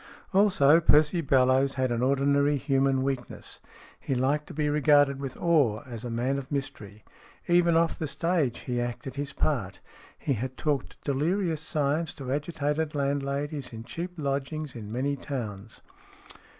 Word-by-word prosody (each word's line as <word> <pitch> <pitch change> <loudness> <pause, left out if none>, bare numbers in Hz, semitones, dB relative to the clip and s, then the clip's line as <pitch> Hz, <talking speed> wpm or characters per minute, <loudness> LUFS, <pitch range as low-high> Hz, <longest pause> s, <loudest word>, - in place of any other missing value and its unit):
Also, 185 -6 +5
Percy 155 +1 +4
Bellowes 135 -1 +3
had 130 -2 0
an 120 0 0
ordinary 140 +2 +2
human 135 -1 +1
weakness; 135 -2 -4 0.4
he 135 - -2
liked 140 +4 0
to - - -9
be 150 -1 0
regarded 145 -2 +4
with 135 -2 -6
awe 145 -10 +2
as 120 -3 -7
a 120 - -4
man 125 +4 -1
of 135 +1 -10
mystery. 135 -7 -5 0.4
Even 175 -1 +4
off 165 0 +1
the 155 - -2
stage 160 -4 0
he 120 -1 -2
acted 120 +2 -5
his 140 0 -3
part. 115 -11 -1 0.4
He 140 - -1
had 130 +2 -4
talked 145 -4 -2
delirious 160 +4 0
science 155 0 -1
to 135 -4 -6
agitated 150 +1 -1
landladies 140 0 -2
in 115 0 -7
cheap 175 +8 -6
lodgings 140 0 -3
in 105 -3 -7
many 135 +4 -1
towns. 110 -7 -6
140 Hz, 150 wpm, -27 LUFS, 130-150 Hz, 0.4 s, Also